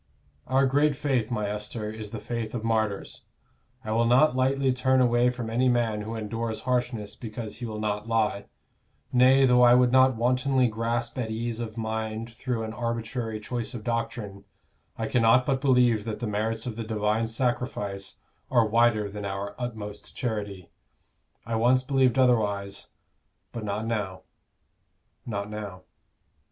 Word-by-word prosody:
Our 135 +1 +3
great 145 +2 +3
faith, 130 -6 0
my 105 -4 -1
Esther, 105 +1 -4
is 110 -1 -7
the 115 - -6
faith 115 +1 -4
of 115 - -3
martyrs: 110 -3 -1 0.6
I 110 - -4
will 115 +1 +2
not 125 +3 +5
lightly 135 +1 +2
turn 130 +1 +2
away 120 0 +4
from 125 -2 -4
any 125 +3 +2
man 115 -3 +1
who 110 +2 -5
endures 110 +1 -3
harshness 120 -4 -2
because 110 -2 -7
he 120 - -5
will 110 -1 -5
not 105 0 -2
lie; 110 -3 0 0.7
nay, 130 +2 +6
though 125 -1 +5
I 120 0 +7
would 125 -1 +4
not 130 0 +5
wantonly 125 +2 +2
grasp 115 +2 -2
at 115 -3 -2
ease 115 +1 -3
of 115 -1 -5
mind 110 +1 -3
through 120 -1 -3
an 110 0 -5
arbitrary 115 -1 -3
choice 120 +3 -4
of 110 - -6
doctrine, 115 -4 -3 0.5
I 115 - -2
cannot 120 +2 +4
but 135 -2 0
believe 125 -5 +3
that 110 -2 -4
the 120 - -3
merits 110 +1 -2
of 115 -3 -5
the 115 - -3
Divine 110 0 0
Sacrifice 115 -5 -2 0.3
are 120 -3 +4
wider 110 -1 +3
than 105 +1 -7
our 100 0 -4
utmost 110 -4 -6
charity. 105 -7 -4 0.7
I 115 - -4
once 125 +3 +3
believed 130 -2 +2
otherwise 105 -6 +1 0.6
but 115 - -6
not 105 +1 -2
now, 100 -5 -3 1.0
not 100 -3 -3
now." 105 -3 -7
115 Hz, 160 wpm, -27 LUFS, 105-125 Hz, 1.0 s, I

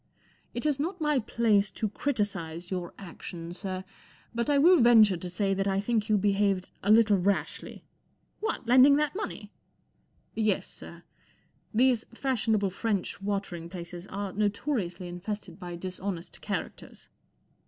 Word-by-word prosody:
' - - -36
It 240 - -4
is 290 -2 +1
not 355 +5 -2
my 300 -3 +2
place 215 -3 +2
to 220 - -1
criticize 195 - -3
your 180 -2 -3
actions, 175 -2 -8
sir, 190 -2 -4 0.5
but 235 +3 -1
I 290 - +4
will 335 +2 +6
venture 225 -5 +7
to 180 +1 -6
say 195 +2 0
that 195 +1 0
I 195 0 +1
think 215 +1 0
yon 215 - +4
behaved 200 -1 +1
a 200 - -2
little 215 -2 +6
rashly*" 200 +2 -1
M - - -14 0.6
What, 440 - -2
lending 255 +4 +7
that 300 +2 0
money? 425 - -4
J - - -12 0.5
* - - -40
gi 225 - -1
Yes, 215 -3 +1
sir. - - -11 0.7
These 245 0 +3
fashionable 220 -7 +1
French 200 -1 -2
water* 200 -2 -2
ing 170 0 -8
places 175 0 -8
are 200 -1 -4
notoriously 205 -3 -1
infested 175 +1 -6
by 175 -2 -6
dis¬ 185 +1 -7
honest 185 -4 -5
characters." - - -6
205 Hz, 165 wpm, -28 LUFS, 185-235 Hz, 0.7 s, venture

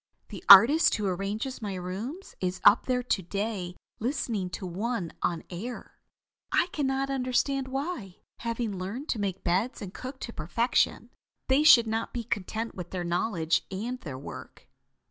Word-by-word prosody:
The - - -9
artist 235 - +9
who 210 - -2
arranges 200 +8 -3
my 205 -3 -4
rooms 205 - -6
is 185 0 -2
up 205 +3 +6
there 250 -1 +1
to 230 -5 0
day 195 -1 -3 0.2
listening 230 -6 -2
to 185 - -6
one 190 0 -3
on 170 -2 -1
air. 225 +8 -7 0.5
I 350 - +2
can 290 -3 -1
not 270 +1 -1
understand 265 +1 0
why, 265 - -5 0.2
having 230 -3 -3
learned 220 +11 -5
to 225 - -1
make 195 -2 -3
beds 190 +8 0
and 200 -3 -7
cook 260 +1 -7
to 235 - -6
perfection, 205 +10 0 0.4
they 265 +2 +4
should 270 -6 +8
not 225 +1 -2
be 240 - -2
content 220 +1 -3
with 180 -2 -7
their 180 -2 -3
knowledge 170 -2 0
and 235 +7 -4
their 140 -5 -6
work." 135 - -10
220 Hz, 165 wpm, -28 LUFS, 185-255 Hz, 0.5 s, artist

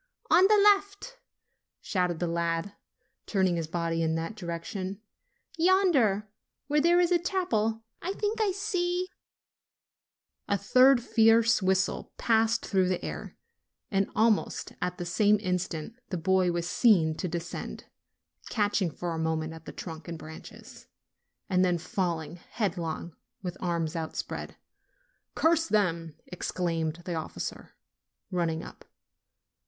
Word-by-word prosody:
"On 375 - +7
the 425 +1 +5 0.2
left," 400 +5 -11 0.6
shouted 180 -5 -1
the 175 - -1
lad, 170 +3 -1 0.5
turning 190 -3 +2
his 165 -2 -2
body 165 0 -1
in 160 0 +1
that 165 +5 -3
direction, 185 +1 -5 0.6
"yonder, 320 - +3 0.4
where 295 +2 +2
there 345 +3 +5
is 355 0 +3
a 350 - +4
chapel, 225 - 0 0.2
I 375 - -2
think 425 +2 -1
I 415 -2 +3
see" 365 -2 -1 1.4
A 200 - +2
third 255 +4 +5
fierce 225 0 +4
whistle 190 0 0
passed 225 0 +2
through 190 -2 +2
the 185 - -1
air, - - -6 0.5
and 195 -1 +1
almost 220 0 +1
at 180 0 -2
the 175 - -4
same 205 +4 +3
instant 180 -2 -2 0.2
the 185 - -2
boy 185 +1 +2
was 170 0 -2
seen 180 -7 +4
to 185 - -2
descend, 170 - -5 0.6
catching 205 -3 +1
for 170 +2 -4
a 160 - -3
moment 160 0 -1
at 160 0 -12
the - - -7
trunk 160 -2 -8
and 170 -1 -5
branches, 160 0 -12 0.6
and 185 -2 +3
then 180 -1 +2
falling 170 -2 -3
headlong 175 -5 -4 0.3
with 180 -1 -4
arms 170 -3 -1
outspread. 160 -1 -4 0.8
"Curse 325 0 +3
them 170 - 0
!" - - -43
exclaimed 170 -2 -2
the 180 - -3
officer, 160 -1 -5 0.6
running 165 -3 -1
up. - - -11
185 Hz, 135 wpm, -28 LUFS, 170-230 Hz, 1.4 s, On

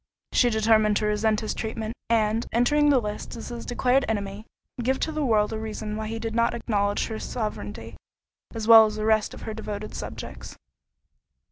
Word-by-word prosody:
She 245 - +4
determined 215 -1 +3
to 215 - -1
resent 210 0 +1
his 215 - -2
treatment; 220 0 -4 0.2
and, 225 0 +1
entering 295 +6 +3
the 280 - +5
lists 210 -1 -4
as 230 - -7
his 240 -1 -7
declared 250 +2 +2
enemy, 205 0 -3 0.3
give 265 +3 0
to 320 - 0
the 305 -1 -2
world 220 -4 +2
a 220 - -3
reason 215 -1 -5
why 215 0 -4
he 225 +1 -4
did 225 0 -4
not 235 +1 +2
acknowledge 205 -3 0
her 220 -1 -5
sovereignty, 215 -3 -5 0.6
as 225 -2 -5
well 225 -1 +9
as 215 - -5
the 215 0 -3
rest 220 -1 +2
of - - -11
her 220 - -4
devoted 215 -1 -6
subjects. - - -7
220 Hz, 190 wpm, -25 LUFS, 215-235 Hz, 0.6 s, well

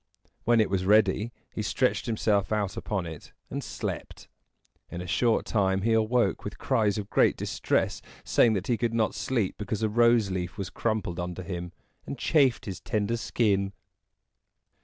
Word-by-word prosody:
When 120 0 +4
it 110 - +2
was 95 -2 +1
ready, 105 +2 +3 0.2
he - - -3
stretched 125 +4 0
himself 105 -3 +1
out 105 -3 0
upon 95 -4 -3
it 80 -3 -9 0.2
and - - -3
slept. - - -6 0.6
In 85 - -6
a 90 - -5
short 115 +6 +1
time 95 -3 +1
he 115 +1 +2
awoke 110 -2 +2
with - - -6
cries 105 -3 +1
of 100 -1 -5
great - - +3
distress, - - -1 0.2
saying 115 - +4
that 95 -2 -2
he 120 -1 +1
could 115 -1 -1
not 110 -2 +1
sleep 100 0 -1
because 105 +1 -3
a 110 - +2
rose 115 -2 +4
leaf 90 0 -3
was 95 -2 -4
crumpled 110 -6 -2
under 90 +1 -4
him, 90 -1 -5 0.4
and - - -5
chafed 140 -7 +2
his 95 -3 -5
tender 105 +2 -1
skin. 100 -4 0
105 Hz, 170 wpm, -27 LUFS, 95-115 Hz, 0.6 s, When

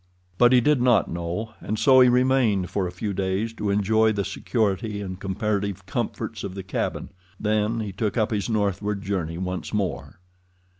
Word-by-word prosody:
But 120 0 +6
he 125 -1 +6
did 145 0 +3
not 120 -6 +3
know, 85 +6 -4
and 110 - -3
so 130 +2 +6
he 125 -1 +7
remained 125 -7 +2
for 95 -3 0
a - - -6
few 100 +3 -4
days 95 +4 -1
to 105 -2 -3
enjoy 110 +2 +3
the 100 -2 -1
security 105 0 -1
and 95 -2 -6
comparative 100 0 -2
comforts - - -4
of 95 - -5
the 95 - -5
cabin. 95 - -3 0.3
Then 110 +1 0
he 105 -2 -4
took 105 +4 -2
up 110 -1 +1
his 105 +1 -1
northward 100 -1 -1
journey 85 -5 -2
once 95 +3 -4
more. 85 -9 -3
105 Hz, 180 wpm, -24 LUFS, 95-110 Hz, 0.3 s, he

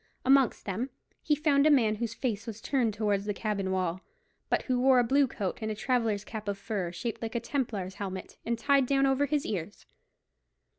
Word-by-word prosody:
Amongst 270 -1 +4
them 215 +7 -2 0.3
he 300 - +2
found 290 -1 +3
a - - +6
man 225 -7 +4
whose 230 0 -3
face 225 -3 -2
was 225 -1 -6
turned 245 -2 +1
towards 205 -2 0
the 205 -1 -2
cabin 200 -3 -2
wall, 185 -1 -1 0.5
but - - +1
who 255 -2 0
wore 260 0 +5
a 245 - +5
blue 275 +3 +3
coat 200 -6 -4
and 220 - -2
a 215 - -2
traveller's 225 -3 0
cap 215 -2 -7
of 200 -1 -1
fur, 200 -4 -3
shaped 185 +7 -4
like 225 +1 -4
a - - +2
Templar's 230 -7 -3
helmet, 190 -2 -6
and 235 0 -1
tied 275 +1 +3
down 275 0 +3
over 270 +1 +2
his 295 0 0
ears. 200 -1 -5
225 Hz, 205 wpm, -29 LUFS, 200-265 Hz, 0.5 s, a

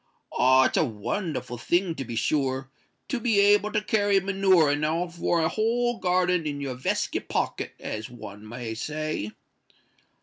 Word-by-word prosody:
Ah! 130 +1 +5
it's - - +1
a - - +4
wonderful 125 - -3
thing, 175 +5 +1
to 140 - -5
be 120 -2 -6
sure, 135 +1 0 0.4
to 260 - -2
be 225 -3 +2
able 205 +1 +4
to 210 - 0
carry 205 -2 +3
manure 190 -5 +3
enow 155 +4 0
for 170 0 0
a - - +3
whole 235 +4 0
garden 180 -2 +1
in 145 -1 -3
your 140 -2 -3
veskit 125 +1 -2
pocket, - - -2
as 110 0 -5
one 105 -3 -10
may 120 -1 -5
say." 150 -1 -3
160 Hz, 160 wpm, -26 LUFS, 130-195 Hz, 0.4 s, Ah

